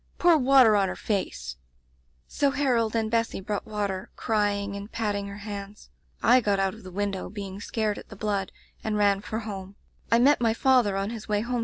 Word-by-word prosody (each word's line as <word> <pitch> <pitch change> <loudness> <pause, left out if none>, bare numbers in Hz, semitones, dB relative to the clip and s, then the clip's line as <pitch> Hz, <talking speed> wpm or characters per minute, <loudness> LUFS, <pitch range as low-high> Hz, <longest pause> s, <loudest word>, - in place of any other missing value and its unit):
Pour 345 -1 +5
water 255 -4 +6
on 200 -2 +3
her - - -4
face!* 65 - -3 0.7
"So 285 - +1
Harold 250 -6 +1
and 220 -1 0
Bessy 230 -3 0
brought 205 +1 -4
water, 205 -1 -3
cry 210 -3 +1
ing 200 0 -4
and 200 +2 -7
patting 205 -3 -2
her 200 0 -8
hands. 205 0 -8 0.3
I 250 +3 +6
got 205 -3 +1
out 195 -1 +1
of 220 - -12
the 185 - -10
window, 195 0 -3
being 200 -2 -7
scared 215 -2 -2
at - - -14
the 210 - -10
blood, 200 -2 -2 0.3
and 215 -1 -1
ran 200 -1 +3
for 220 +2 -4
home. 195 -2 -7
205 Hz, 165 wpm, -26 LUFS, 200-220 Hz, 0.7 s, water